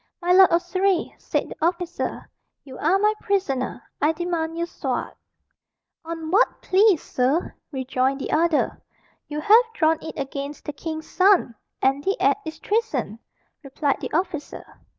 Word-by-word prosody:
"My 355 0 0
lord 380 0 +8
of 340 +1 +2
Surrey," 370 +1 0
said - - -2
the - - -9
officer, 350 +1 -2 0.4
"you 265 -2 -11
are 340 +6 +3
my 420 +2 +3
prisoner. 270 - -1 0.2
I 300 +3 +3
demand 330 -1 -2
your 340 - 0
sword." 345 - -4 0.9
"On 325 -1 -5
what 420 +7 +3
plea, 390 0 +4
sir?" 275 +3 -1 0.2
rejoined 265 0 -1
the - - -4
other. 320 0 +1 0.5
"You 300 0 -4
have 440 +8 +7
drawn 320 -1 +2
it 320 - -8
against 280 +1 -5
the 295 - -4
king's 315 +1 -6
son 370 -8 +3 0.3
and 270 +2 +2
the 390 +4 0
act 420 - +1
is 315 0 -6
treason," 310 - -1 0.4
replied 280 0 -1
the - - -5
officer. 340 -2 -3
325 Hz, 150 wpm, -23 LUFS, 285-370 Hz, 0.9 s, lord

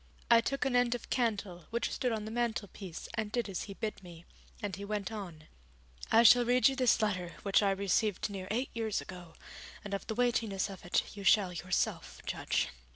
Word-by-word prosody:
I 230 0 +8
took 275 +4 -1
an 265 -2 +1
end 245 -1 +3
of 245 - -9
candle 205 -8 -1
which 235 +1 -1
stood 250 - -1
on 215 -2 -2
the 215 - -6
mantelpiece 220 -6 -3
and 220 -2 -2
did 240 -1 -1
as 195 -3 -4
he 200 - -8
bid 215 -1 -4
me, 175 -2 -12 0.3
and 205 -3 -3
he 200 - -8
went 205 0 -3
on: 180 -8 -7 0.7
'I 230 - +7
shall 245 +1 +8
read 245 +1 +4
you 270 - -3
this 255 -4 +3
letter 185 -5 -1
which 200 +1 +4
I 200 - +3
received 200 +1 +1
near 195 -3 -6
eight 245 +5 -1
years 225 -2 -1
ago, 175 -3 -10 0.5
and 200 - -5
of 200 - -3
the 220 - -3
weightiness 225 -5 0
of 190 - -10
it 175 - 0
you 200 - -7
shall 195 -2 +4
yourself 180 +2 -2
judge.' - - -1
210 Hz, 205 wpm, -32 LUFS, 190-235 Hz, 0.7 s, I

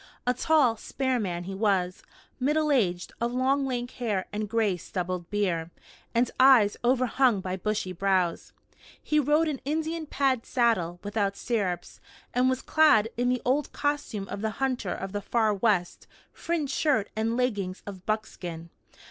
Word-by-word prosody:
A 250 - +3
tall, 255 -3 +3
spare 260 +2 -1
man 175 -5 -3
he 195 +2 -6
was, 190 -3 0 0.4
middle 300 +3 +1
aged, 185 -10 +1
of 235 +1 0
long 270 +2 +1
lank 245 -1 -3
hair 210 -7 -2
and 210 0 -3
gray 220 -4 +1
stubbled 180 0 -4
beard, 180 -6 -1 0.5
and 240 +1 +2
eyes 255 -6 +6
overhung 255 -2 +3
by 185 0 -3
bushy 195 -1 -2
brows. 185 -2 0 0.5
He 300 - +1
rode 300 +3 +3
an 290 -4 -3
Indian 315 +2 -2
pad 265 -5 +1
saddle, 185 -9 +1
without 205 -1 -1
stirrups, 195 -7 -2 0.3
and 250 +1 +3
was 260 0 -1
clad 225 -9 +4
in 245 +1 +1
the 250 -1 0
old 275 +4 +1
costume 290 -9 -2
of 200 +1 -5
the 220 - 0
hunter 255 -8 -1
of 195 0 -5
the 205 0 -3
Far 220 0 +1
West 200 -4 0 0.3
fringed 310 -5 -2
shirt 265 -10 +1
and 225 +2 0
leggings 205 -7 -1
of 190 -3 -8
buckskin. 175 -6 -4
225 Hz, 155 wpm, -27 LUFS, 195-260 Hz, 0.5 s, eyes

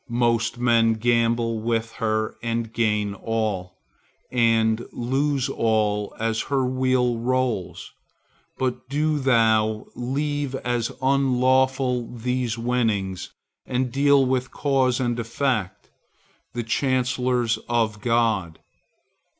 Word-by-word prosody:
Most 120 -1 +1
men 115 -2 +3
gamble 115 0 +1
with 115 0 -1
her, 110 -1 0
and 115 -1 -3
gain 105 -3 0
all, 100 -4 -3 0.5
and 115 -1 +2
lose 135 +2 0
all, 105 -5 0
as 115 0 0
her 135 -2 +1
wheel 130 -2 +1
rolls. 120 -7 -2 0.7
But 130 0 -3
do 150 +2 0
thou 110 -4 +2
leave 140 +2 -2
as 120 -3 -2
unlawful 130 -2 +2
these 125 0 -1
winnings, 110 -6 -1 0.4
and 125 -1 -1
deal 140 +1 +4
with 130 -1 0
Cause 135 -3 +1
and 120 -2 -1
Effect, 115 -5 -2 0.6
the 120 0 -3
chancellors 125 -1 0
of 110 -3 0
God. 110 -8 +1
120 Hz, 100 wpm, -24 LUFS, 110-130 Hz, 0.7 s, deal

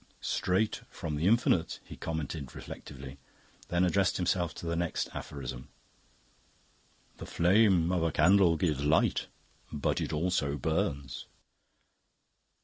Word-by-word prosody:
"Straight 95 +4 0
from 75 -2 -5
the 80 +4 0
Infinite," 110 -6 +2
he - - -10
commented 80 -4 -5
reflectively, 65 0 -9 0.5
then 85 +1 +1
addressed 95 +1 +2
himself 90 -2 0
to - - -8
the 85 0 -1
next 85 0 -1
aphorism. 65 -3 -6 1.5
"The - - -8
flame 90 -1 +4
of 90 -2 +1
a 80 0 +1
candle 85 +2 +5
gives 75 -4 0
Light, 75 +2 +2 0.4
but 75 - -1
it - - -2
also 75 -3 0
Burns." 70 -1 -2
85 Hz, 120 wpm, -30 LUFS, 70-90 Hz, 1.5 s, candle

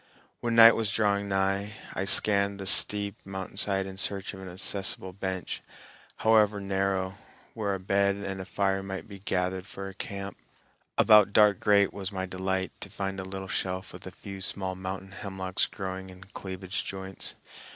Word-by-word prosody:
When 120 -1 -1
night 115 0 +10
was 110 -2 -1
drawing 100 -1 +1
nigh, 95 +2 0 0.2
I 95 - -2
scanned 100 0 +4
the 95 - -5
steep 100 +1 +4
mountainside 95 0 -1
in 95 0 -8
search 100 0 -2
of 95 - -9
an 95 - -7
accessible 95 0 -3
bench, 95 -2 -4 0.6
however 105 -2 +5
narrow, 95 -1 -1 0.3
where 100 -3 -1
a - - -5
bed 100 +1 +2
and 100 -1 -5
a - - -7
fire 95 +1 0
might 95 0 -6
be 100 -2 -10
gathered 95 0 -1
for 95 -2 -7
a 95 - -8
camp. 100 0 -6 0.6
About 105 -2 +6
dark 105 -3 +5
great 100 -2 +4
was 100 0 -4
my 95 -1 -3
delight 95 0 -2
to - - -5
find 95 -1 -4
a - - -3
little 95 0 -6
shelf 95 0 -3
with - - -10
a - - -4
few 95 -1 -9
small 95 0 0
mountain 95 +1 -6
hemlocks 95 -1 -2
growing 95 -1 -6
in 90 +1 -12
cleavage 95 -1 -5
joints. 95 0 -6
95 Hz, 170 wpm, -28 LUFS, 95-100 Hz, 0.6 s, night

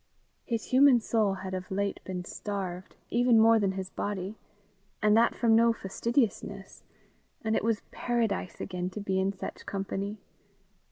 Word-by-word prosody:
His 230 -3 -2
human 260 -1 +6
soul 215 -3 +1
had 190 0 -6
of 185 +1 -4
late 200 0 -1
been 180 -1 -5
starved, 185 -3 -5 0.2
even 240 -1 +4
more 225 0 +6
than 195 -2 +1
his 190 -1 -5
body 200 0 -3 0.6
and 210 0 +4
that 230 +1 +4
from 230 -2 +3
no 230 0 +5
fastidiousness; 205 -2 -2 0.6
and 220 0 +1
it - - 0
was 225 -1 0
paradise 230 -6 -1
again 180 0 -3
to 190 - -7
be 190 -2 -1
in 190 +1 +1
such 195 - -8
company. 195 +1 -3
205 Hz, 155 wpm, -29 LUFS, 190-230 Hz, 0.6 s, human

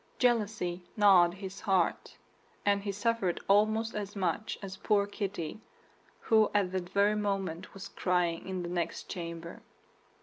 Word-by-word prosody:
Jealousy 210 -7 +1
gnawed 185 -4 +6
his 195 0 -7
heart; 190 -4 0 0.5
and 200 0 +3
he 200 0 -2
suffered 205 -3 0
almost 215 +3 +3
as 205 -1 -5
much 190 +2 -1
as 190 -1 -6
poor 205 0 +2
Kitty, 200 -2 -4 0.6
who 220 -1 +4
at 195 -3 +2
that 185 -2 -3
very 200 +2 +3
moment 195 -5 -2
was 195 +2 -8
crying 180 -2 0
in 185 -1 -3
the 175 - -4
next 175 -1 -3
chamber. 170 -1 -6
195 Hz, 140 wpm, -31 LUFS, 180-205 Hz, 0.6 s, gnawed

